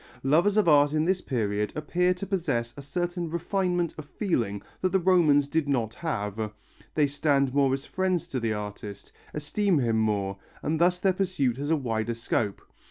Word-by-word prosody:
Lovers 170 Hz, +10 st, +3 dB
of 210 Hz, -, +4 dB
art 145 Hz, -1 st, +5 dB
in 155 Hz, 0 st, +2 dB
this 185 Hz, +1 st, +1 dB
period 105 Hz, -5 st, -1 dB
appear 180 Hz, +4 st, +1 dB
to 180 Hz, -, -5 dB
possess 140 Hz, -, -1 dB
a 140 Hz, -, -8 dB
certain 175 Hz, +4 st, -3 dB
refinement 175 Hz, 0 st, -1 dB
of 155 Hz, -, -7 dB
feeling 115 Hz, -, -2 dB, 0.2 s
that 185 Hz, -, +2 dB
the 190 Hz, -, +3 dB
Romans 165 Hz, -6 st, +4 dB
did 155 Hz, -1 st, 0 dB
not 115 Hz, -5 st, 0 dB
have, 110 Hz, -, -3 dB, 0.4 s
they 150 Hz, -, +4 dB
stand 140 Hz, -2 st, +1 dB
more 140 Hz, -2 st, +3 dB
as 135 Hz, +1 st, -2 dB
friends 185 Hz, -3 st, -1 dB
to 130 Hz, -, -2 dB
the 115 Hz, -2 st, -1 dB
artist, 105 Hz, -1 st, -7 dB, 0.2 s
esteem 175 Hz, +5 st, +1 dB
him 115 Hz, -4 st, +1 dB
more, 100 Hz, -3 st, 0 dB, 0.2 s
and 160 Hz, +1 st, 0 dB
thus 180 Hz, +1 st, +3 dB
their 190 Hz, 0 st, +2 dB
pursuit 175 Hz, -10 st, 0 dB
has 145 Hz, +2 st, -3 dB
a 160 Hz, -, +4 dB
wider 115 Hz, -4 st, -2 dB
scope. 115 Hz, -3 st, -2 dB
145 Hz, 180 wpm, -27 LUFS, 115-175 Hz, 0.4 s, art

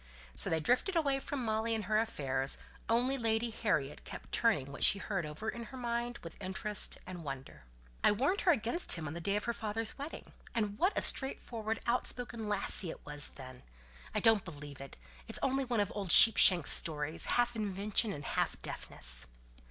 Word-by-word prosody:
So -, -, +4 dB
they 160 Hz, -, 0 dB
drifted 250 Hz, -, 0 dB
away 280 Hz, -5 st, +1 dB
from 270 Hz, -2 st, -5 dB
Molly 220 Hz, +1 st, -1 dB
and 220 Hz, -, -3 dB
her 215 Hz, +2 st, +1 dB
affairs; 135 Hz, -11 st, -1 dB, 0.3 s
only 250 Hz, +4 st, +1 dB
Lady 225 Hz, 0 st, 0 dB
Harriet 150 Hz, -11 st, -2 dB
kept -, -, -10 dB
turning 175 Hz, -, +1 dB
what 145 Hz, -, -4 dB
she 200 Hz, -, +5 dB
had -, -, -9 dB
heard 195 Hz, -5 st, -1 dB
over 155 Hz, +9 st, -8 dB
in 235 Hz, +1 st, -4 dB
her 245 Hz, -, -12 dB
own 250 Hz, -, -8 dB
mind 240 Hz, 0 st, -3 dB
with 165 Hz, -, -11 dB
interest 200 Hz, +2 st, 0 dB
and 180 Hz, -2 st, -8 dB
wonder. 135 Hz, -, -8 dB, 0.4 s
"I -, -, +5 dB
warned 275 Hz, -, 0 dB
her 355 Hz, -, +4 dB
against 260 Hz, +5 st, +2 dB
him 165 Hz, -3 st, -3 dB
the 170 Hz, -, -7 dB
day 200 Hz, +4 st, -1 dB
of 210 Hz, -, -2 dB
her 235 Hz, -, -2 dB
father's 225 Hz, +3 st, -4 dB
wedding. 290 Hz, +3 st, -8 dB, 0.2 s
And 210 Hz, -2 st, -2 dB
what 370 Hz, +4 st, +1 dB
a -, -, +1 dB
straightforward, 225 Hz, -5 st, -1 dB
out 245 Hz, +1 st, 0 dB
spoken 235 Hz, -3 st, -4 dB
topic 205 Hz, 0 st, +1 dB
it 165 Hz, -, -8 dB
was 145 Hz, 0 st, +2 dB
then! 130 Hz, -2 st, -11 dB, 0.5 s
I -, -, +2 dB
don't 225 Hz, -3 st, +4 dB
believe 145 Hz, -5 st, -10 dB
it; 135 Hz, -, -11 dB, 0.3 s
it's -, -, -1 dB
only 270 Hz, 0 st, 0 dB
one 240 Hz, -3 st, -1 dB
of 205 Hz, -, 0 dB
old 200 Hz, -3 st, -5 dB
Sheepshanks' 185 Hz, -7 st, +8 dB
stories, 155 Hz, 0 st, +4 dB
half 240 Hz, 0 st, +1 dB
invention 210 Hz, +1 st, -1 dB
and 145 Hz, -4 st, -7 dB
half -, -, -2 dB
deafness." -, -, -3 dB
215 Hz, 195 wpm, -32 LUFS, 165-235 Hz, 0.5 s, Sheepshanks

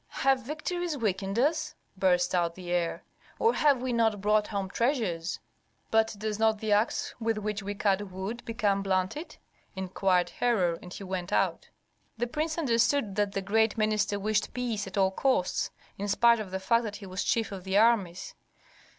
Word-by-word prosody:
"Have 270 Hz, -1 st, +4 dB
victories 310 Hz, +4 st, -3 dB
weakened 195 Hz, -3 st, -1 dB
us?" 310 Hz, +4 st, +1 dB, 0.2 s
burst 185 Hz, -2 st, +2 dB
out 170 Hz, -2 st, +1 dB
the 180 Hz, -2 st, -7 dB
heir. 175 Hz, -1 st, -1 dB, 0.3 s
"Or 455 Hz, +1 st, +3 dB
have 280 Hz, -4 st, +3 dB
we 255 Hz, -1 st, -1 dB
not 225 Hz, -3 st, +2 dB
brought 210 Hz, +1 st, +2 dB
home 200 Hz, -2 st, -2 dB
treasures?" 195 Hz, -, -1 dB, 0.5 s
"But 220 Hz, 0 st, +3 dB
does 215 Hz, 0 st, -3 dB
not 220 Hz, -1 st, +3 dB
the 215 Hz, 0 st, -3 dB
axe 210 Hz, +3 st, +1 dB
with 225 Hz, -1 st, 0 dB
which 210 Hz, 0 st, -3 dB
we 200 Hz, +1 st, -4 dB
cut 200 Hz, 0 st, 0 dB
wood 195 Hz, +6 st, -5 dB
become 215 Hz, -4 st, 0 dB
blunted?" 195 Hz, -, -2 dB, 0.4 s
inquired 190 Hz, -1 st, +1 dB
Herhor; 185 Hz, -9 st, +1 dB
and 180 Hz, -, -11 dB
he 200 Hz, -, -7 dB
went 185 Hz, -1 st, -4 dB
out. -, -, 0 dB, 0.5 s
The 240 Hz, -, 0 dB
prince 310 Hz, +6 st, -2 dB
understood 235 Hz, -, +2 dB
that 205 Hz, -1 st, 0 dB
the 195 Hz, -, -2 dB
great 220 Hz, +2 st, +2 dB
minister 215 Hz, -1 st, +1 dB
wished 215 Hz, +2 st, -1 dB
peace 230 Hz, -5 st, -2 dB
at 195 Hz, -, -7 dB
all 190 Hz, -1 st, +3 dB
costs, 255 Hz, -3 st, +1 dB, 0.3 s
in 205 Hz, -, -2 dB
spite 235 Hz, +3 st, +4 dB
of 210 Hz, -3 st, -5 dB
the 190 Hz, +1 st, -3 dB
fact 230 Hz, +5 st, +2 dB
that 210 Hz, -1 st, -4 dB
he 205 Hz, -, -9 dB
was 185 Hz, +1 st, -3 dB
chief 225 Hz, -2 st, 0 dB
of 190 Hz, -2 st, -7 dB
the 190 Hz, +1 st, 0 dB
armies. 205 Hz, -6 st, +2 dB
210 Hz, 180 wpm, -29 LUFS, 190-235 Hz, 0.5 s, Have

